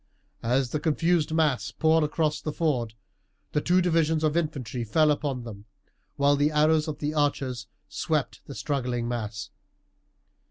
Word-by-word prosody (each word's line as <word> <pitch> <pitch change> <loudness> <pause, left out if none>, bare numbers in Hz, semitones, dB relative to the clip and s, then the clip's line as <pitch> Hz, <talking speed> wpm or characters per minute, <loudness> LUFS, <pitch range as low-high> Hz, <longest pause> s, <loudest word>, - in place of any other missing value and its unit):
As 125 +2 +1
the 150 - -1
confused 160 +1 +1
mass 150 -9 +1
poured 160 0 +2
across 150 0 0
the 155 - -3
ford 125 -9 -1 0.6
the 150 - 0
two 180 +3 +3
divisions 160 -2 +2
of 155 0 +1
infantry 135 -8 -2
fell 150 +7 +3
upon 145 -4 -2
them, 105 -3 -9 0.5
while 140 0 +3
the 145 +1 +2
arrows 155 +1 +3
of 155 - -4
the 150 +1 -2
archers 135 -5 -1 0.2
swept - - -2
the - - -8
struggling 125 -4 -2
mass. 110 -3 -4
150 Hz, 150 wpm, -26 LUFS, 125-155 Hz, 0.6 s, two